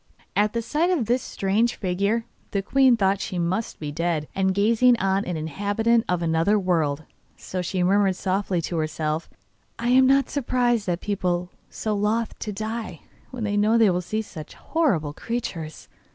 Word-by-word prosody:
At 210 +1 +2
the 230 0 -1
sight 310 +9 +1
of 335 -11 +1
this 245 +3 +1
strange 215 +5 0
figure 200 +4 0 0.2
the 200 -1 -1
queen 260 +2 +4
thought 195 -1 +1
she 185 - -4
must 180 +6 -2
be 150 -2 -4
dead, 165 -1 -1
and 190 0 +1
gazing 230 +5 +4
on 195 -1 +1
an 175 -2 -3
inhabitant 205 +9 0
of 180 -1 0
another 165 +5 +2
world. 160 -6 0 0.3
So 185 - -4
she 180 +1 -1
murmured 195 +1 +3
softly 185 -2 -1
to 170 - -3
herself: 155 0 -2 0.5
'I 235 +1 -1
am 260 +1 +6
not 275 -1 +4
surprised 245 -5 +1
that 175 -1 -1
people 180 -3 -1
are - - -33
so 215 - -3
loth 215 +3 0
to 210 - -4
die 215 -4 -5 0.3
when 250 -3 -6
they 205 -1 -1
know 210 +2 +3
that - - +5
they 225 -3 +5
will 180 0 0
see 215 +5 -3
such 160 -7 -10
horrible 190 - 0
creatures. 170 -8 -5
200 Hz, 180 wpm, -24 LUFS, 175-230 Hz, 0.5 s, am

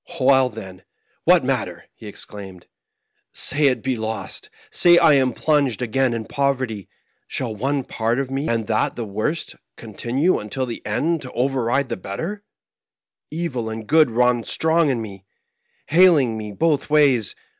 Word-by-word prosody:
"Well, 130 -1 +4
then, 95 -5 -10 0.4
what - - +5
matter? - - -2
" - - -56
he - - -13
exclaimed. 95 -3 -10 0.7
*5 - - -10
Say 145 +1 +4
it 130 - 0
be 130 -1 -1
lost, 110 - -5 0.2
say 175 - +6
I 165 -3 +5
am 130 -2 +3
plunged 140 -1 0
again 125 +1 0
in 110 -1 -5
poverty: 130 -8 -2 0.4
shall 120 -4 -3
one 135 +6 -2
part 115 0 -2
of 135 -1 -3
me, 135 +3 -2
and 115 -2 -1
that 110 0 0
the 120 - -4
worst, 110 +11 -3 0.2
continue 140 +10 -1
until 130 +5 -4
the 120 -2 -7
end 165 0 -1
to 130 - -9
override 130 +1 0
the - - -3
better} 165 - -6 0.9
Evil 145 -9 -4
and 110 0 -6
good 155 +2 +4
run 120 0 +1
strong 160 +3 +2
in 120 -4 -1
me, 100 -3 -10 0.7
haling 155 -8 +4
me 105 -1 -6
both 155 +7 0
ways. 140 -8 +3
130 Hz, 160 wpm, -21 LUFS, 110-145 Hz, 0.9 s, say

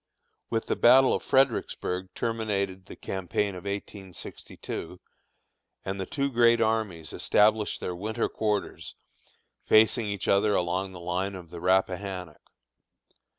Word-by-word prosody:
With 115 -1 -1
the - - -1
battle 130 +2 +6
of - - -1
Fredericksburg 115 -8 0
terminated 100 -5 -2
the - - -10
campaign 95 +2 -2
of 90 -1 -9
1862, 100 -1 -7 0.9
and 95 0 -3
the 95 - -4
two 140 -1 -1
great 120 -1 +4
armies 110 -8 -1
established 105 0 +2
their 90 - -4
winter 110 +5 -2
quarters 105 -2 -3 0.7
facing 110 +1 +4
each 100 -1 -3
other 105 +1 +3
along 90 +2 -1
the 90 - -9
line 90 +3 -2
of 85 -3 -10
the 85 - -7
Rappahannock. 95 -2 -1
100 Hz, 125 wpm, -27 LUFS, 90-110 Hz, 0.9 s, battle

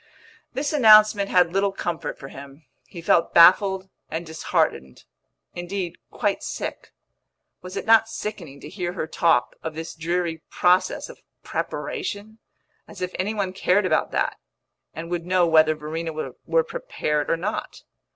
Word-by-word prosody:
This 290 +3 -2
announcement 215 -6 +6
had 180 -2 +3
little 195 +1 +2
comfort 175 -3 -4
for 135 - -10
him; 140 +2 -12 0.2
he 170 -2 -10
felt 165 0 +2
baffled 190 +2 +6 0.2
and 165 +2 -4
disheartened 110 - -2 0.5
indeed, 175 0 -5
quite - - -1
sick. - - -6 0.7
Was 185 +2 -8
it - - -4
not 225 0 +5
sickening 175 -12 -6
to - - -9
hear 175 +1 -4
her 175 - -3
talk 160 -5 +1
of 160 -1 -5
this 160 +1 -6
dreary 165 0 -2
process 180 +1 +2
of - - -13 0.2
preparation? 220 - -4 0.5
as - - -12
if 180 - -3
any 205 +4 -1
one 195 -3 -2
cared 190 +1 +2
about - - +1
that, - - -1 0.6
and 165 +2 -7
would 175 -1 -3
know 180 -1 +3
whether 155 -1 +4
Verena 160 +2 -5 0.4
were - - +3
prepared 455 - -3
or 165 - +2
not! 200 +6 -5
180 Hz, 150 wpm, -24 LUFS, 160-200 Hz, 0.7 s, announcement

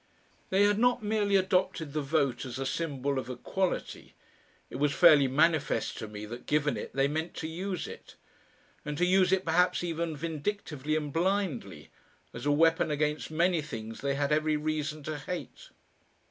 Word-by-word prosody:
They 195 +2 +4
had 205 0 +3
not 245 -1 +3
merely 205 -1 +1
adopted 180 -5 +1
the 155 - 0
Vote 140 -2 0
as 130 -1 -6
a 135 - -3
symbol 140 -2 -1
of 130 - -7
equality; 175 +9 -3 0.5
it - - -7
was 145 0 +1
fairly 150 -6 +7
manifest 155 +2 +1
to 110 - -5
me 105 0 -7
that, 120 +3 -9
given 150 -1 +1
it, - - -6
they 135 0 +3
meant 160 +4 -3
to 160 - -4
use 180 +3 -4
it, - - -11 0.7
and 150 -1 -4
to 180 - +3
use 185 0 +4
it 190 0 +2
perhaps 180 +2 +2
even 165 -2 -2
vindictively 155 -2 -3
and 150 -2 -2
blindly, 165 - -1 0.4
as - - -5
a - - +4
weapon 165 +2 +3
against 150 0 -1
many 170 +1 +2
things 115 -6 -7
they 140 0 0
had 140 +1 0
every 155 0 +2
reason 155 0 -3
to 155 0 -4
hate.... 180 - -7
155 Hz, 175 wpm, -29 LUFS, 140-180 Hz, 0.7 s, fairly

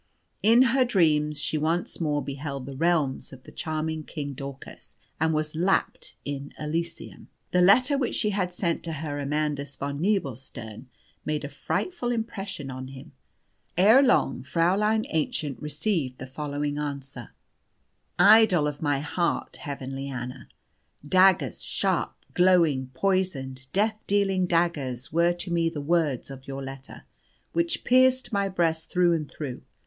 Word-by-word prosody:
In 230 +4 +6
her 265 -1 +4
dreams 150 -9 +2
she 155 +1 0
once 165 +3 -1
more 150 -2 0
beheld 140 -1 -5
the 135 0 -7
realms 155 -3 +1
of 130 -1 -13
the - - -13
charming 155 0 -3
King 145 -2 -5
Daucus, 135 0 -9 0.2
and 160 +1 +2
was 155 0 -1
lapped 180 +4 0
in 140 0 -5
Elysium. 165 +3 -4 0.2
The 180 - +3
letter 255 +10 +5
which 250 - -1
she 210 - +1
had 190 -3 -1
sent 175 -1 -1
to 165 - -3
Herr 145 -1 -4
Amandus 145 -1 -2
von 140 +1 -4
Nebelstern 135 - -3 0.4
made 150 -1 -2
a - - -5
frightful 245 - -2
impression 200 - -4
on 130 0 -6
him. 135 +3 -11 0.7
Ere 215 +9 +7
long, 255 -3 +2
Fräulein 195 +10 +1
Aennchen 150 -2 -1
received 150 -3 -1
the 130 - -7
following 145 +2 -3
answer 140 -4 -6 0.8
'IDOL 215 -8 +6
OF 145 -1 -5
MY 145 -3 +1
HEART, 170 +3 -1
HEAVENLY 135 -2 -5
ANNA, 125 -1 -6 0.6
"Daggers 185 - +4
sharp, - - 0 0.2
glowing, 170 -8 +4
poisoned, 135 -9 -1
death 215 +2 0
dealing 195 -2 +2
daggers 150 -8 -1
were 170 +1 +3
to 175 +1 -4
me 165 -1 +2
the 160 -3 -6
words 145 -4 0
of 135 -1 -11
your 135 0 -5
letter, 135 0 -9 0.5
which 335 0 0
pierced 255 0 +3
my 200 -1 +1
breast 165 -3 0
through 180 -1 +3
and 155 -3 -2
through. 130 -3 -6
155 Hz, 145 wpm, -26 LUFS, 140-185 Hz, 0.8 s, Ere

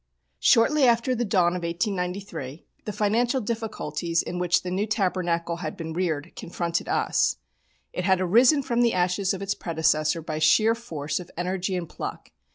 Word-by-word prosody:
Shortly 265 +5 +4
after 240 +2 +3
the 240 -1 -1
dawn 180 -5 +2
of 180 - -3
1893 175 -4 -3 0.2
the 210 - -3
financial 225 +5 +1
difficulties 200 -8 -2
in 180 - -5
which 180 0 +2
the 180 - -4
New 200 +4 -1
Tabernacle 175 -5 -1
had 160 -3 -5
been 160 -1 -5
reared 170 -3 -2
confronted 170 -1 -3
us. - - +1 0.6
It 180 - -3
had 190 -1 +3
arisen 240 - +4
from 240 -2 0
the 235 -1 +3
ashes 180 +2 +1
of 195 0 -3
its 195 0 0
predecessor 160 -2 0
by 155 -1 -4
sheer 215 +9 +4
force 155 -10 -4
of 180 - -10
energy 185 +1 -2
and 175 -2 -3
pluck. - - -7
180 Hz, 165 wpm, -25 LUFS, 170-215 Hz, 0.6 s, Shortly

